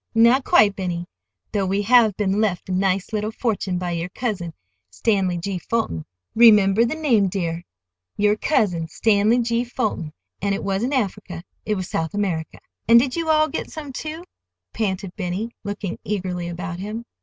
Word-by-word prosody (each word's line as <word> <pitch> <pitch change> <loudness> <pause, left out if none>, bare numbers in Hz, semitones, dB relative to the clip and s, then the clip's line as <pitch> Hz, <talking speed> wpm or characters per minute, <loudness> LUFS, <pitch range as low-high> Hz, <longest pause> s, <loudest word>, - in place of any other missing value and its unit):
"Not 235 +4 +5
quite, 205 -5 +4
Benny, 175 -2 -3 0.5
though 195 -2 0
we 195 +2 0
have 225 -3 +5
been 205 0 +1
left 195 -4 -1
a - - -2
nice 190 +2 0
little 210 0 -1
fortune 220 -5 -2
by 175 -1 -3
your 170 +1 -3
cousin, 190 -7 -4 0.3
Stanley 185 - 0
G. 185 +2 -3
Fulton—remember 195 - +3
the 235 - -2
name, 245 -11 +2
dear, 175 -3 -3 0.5
your 210 0 +3
cousin, 185 - +1
Stanley 215 +5 +2
G. 235 +1 0
Fulton. 220 -10 -3 0.3
And 200 0 +1
it 200 - -5
wasn't 200 +8 0
Africa, 195 -7 -3 0.2
it 210 - +1
was 185 -2 -4
South 160 +2 -2
America." 175 -6 -2 0.3
"And 230 +1 +8
did 255 +1 0
you 330 -1 -2
all 310 0 +4
get 310 - -4
some, 295 -4 -8
too?" 315 +5 -6 0.5
panted 190 -4 -2
Benny, 195 +4 -3
looking 205 -2 -4
eagerly 180 -4 -3
about 175 0 -5
him. 215 +4 -5
200 Hz, 165 wpm, -22 LUFS, 180-230 Hz, 0.5 s, And